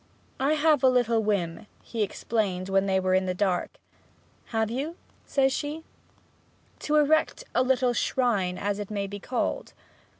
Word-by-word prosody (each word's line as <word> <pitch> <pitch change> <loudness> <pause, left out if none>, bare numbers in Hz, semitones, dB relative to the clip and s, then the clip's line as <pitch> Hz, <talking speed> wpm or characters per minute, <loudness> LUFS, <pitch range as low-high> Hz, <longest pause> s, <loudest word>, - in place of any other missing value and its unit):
'I 275 +3 +2
have 305 -2 +3
had 265 - +5
a - - +7
little 235 -3 +2
whim,' 200 -3 -1 0.2
he 230 - -4
explained 195 -2 -1
when 195 0 +2
they 190 -1 +2
were 185 0 +1
in 185 0 +2
the 180 - -1
dark. 185 -2 -1 0.7
'Have 225 -1 -1
you?' 285 +7 -3 0.3
says 270 -1 +2
she. 300 +3 -4 1.0
'To 300 - -1
erect 310 +10 +3
a - - +3
little 255 -1 +2
shrine, 210 -8 0
as 205 0 -2
it 205 - -5
may 200 -2 -2
be 200 +1 -7
called.' 250 +5 -2
225 Hz, 165 wpm, -27 LUFS, 195-265 Hz, 1.0 s, a